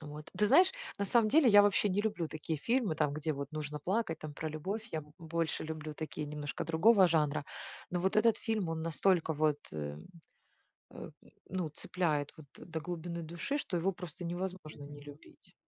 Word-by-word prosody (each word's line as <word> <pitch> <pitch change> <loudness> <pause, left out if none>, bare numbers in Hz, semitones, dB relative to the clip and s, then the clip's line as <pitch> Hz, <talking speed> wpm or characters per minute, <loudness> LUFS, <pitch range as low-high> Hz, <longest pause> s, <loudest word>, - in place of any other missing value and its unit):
Вот. 150 0 -9
Ты 210 - +3
знаешь, 355 - +6 0.3
на 200 - +1
самом 225 +1 +4
деле 300 -5 +6
я 205 -1 +9
вообще 205 0 +3
не 200 +2 +1
люблю 180 -7 -1
такие 155 0 -4
фильмы, 230 - +1
там 145 -1 +1
где 155 +1 -1
вот 140 0 -5
нужно 150 -1 -4
плакать, 180 0 -1
там 150 -1 -7
про 155 - -3
любовь, 190 +9 -4
я 155 -1 -2 0.2
больше 165 -1 -2
люблю 155 -1 -5
такие 155 -1 -4
немножко 145 -1 -4
другого 185 +5 +6
жанра. 150 -2 +1 0.5
Но 175 - -1
вот 190 +2 +1
этот 225 +1 +5
фильм 215 -6 -1
он 160 0 -2
настолько 165 +1 +2
вот, 150 -1 +2
э, 75 -1 -4 1.0
э, - - -8 0.4
ну 180 -4 -2
цепляет 155 -2 -1
вот 155 - -12
до 165 -2 -6
глубины 170 0 -5
души, 170 - -3
что 190 - -3
его 190 +4 +1
просто 175 -1 -8
невозможно 175 -4 -4
не 145 0 -10
любить. 145 +1 -14
165 Hz, 185 wpm, -33 LUFS, 150-190 Hz, 1.0 s, я